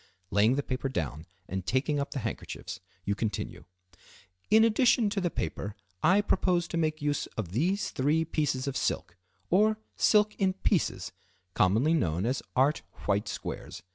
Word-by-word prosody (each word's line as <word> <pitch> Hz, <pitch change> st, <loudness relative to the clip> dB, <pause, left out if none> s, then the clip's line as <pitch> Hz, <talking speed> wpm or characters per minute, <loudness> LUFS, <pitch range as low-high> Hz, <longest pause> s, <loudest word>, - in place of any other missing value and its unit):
Laying 105 Hz, +5 st, +4 dB
the 145 Hz, -, -1 dB
paper 130 Hz, +1 st, -2 dB
down 80 Hz, -, -3 dB, 0.2 s
and 95 Hz, 0 st, -3 dB
taking 130 Hz, -, 0 dB
up 140 Hz, -, -2 dB
the 135 Hz, -, -4 dB
handkerchiefs, -, -, -5 dB, 0.3 s
you 100 Hz, -, +1 dB
continue. 105 Hz, -1 st, -3 dB, 0.8 s
"In 220 Hz, +2 st, +7 dB
addition 230 Hz, -1 st, +4 dB
to 200 Hz, -, -1 dB
the 175 Hz, -, +1 dB
paper, 100 Hz, -, -4 dB, 0.3 s
I 190 Hz, +5 st, +5 dB
propose 175 Hz, -4 st, +1 dB
to -, -, -4 dB
make 155 Hz, -2 st, 0 dB
use 145 Hz, -1 st, 0 dB
of 105 Hz, -6 st, -2 dB
these 180 Hz, -, 0 dB
three 150 Hz, +5 st, +1 dB
pieces 145 Hz, -4 st, -1 dB
of 140 Hz, -1 st, -3 dB
silk, 85 Hz, -, -1 dB, 0.4 s
or 215 Hz, +4 st, +4 dB, 0.2 s
silk 210 Hz, 0 st, +4 dB
in 190 Hz, -2 st, +2 dB
pieces, 190 Hz, -1 st, 0 dB, 0.4 s
commonly 110 Hz, -, +3 dB
known 90 Hz, -, +1 dB
as 125 Hz, +2 st, 0 dB
art 135 Hz, +4 st, +3 dB, 0.2 s
white 100 Hz, 0 st, +1 dB
squares. -, -, -6 dB
145 Hz, 160 wpm, -29 LUFS, -, 0.8 s, In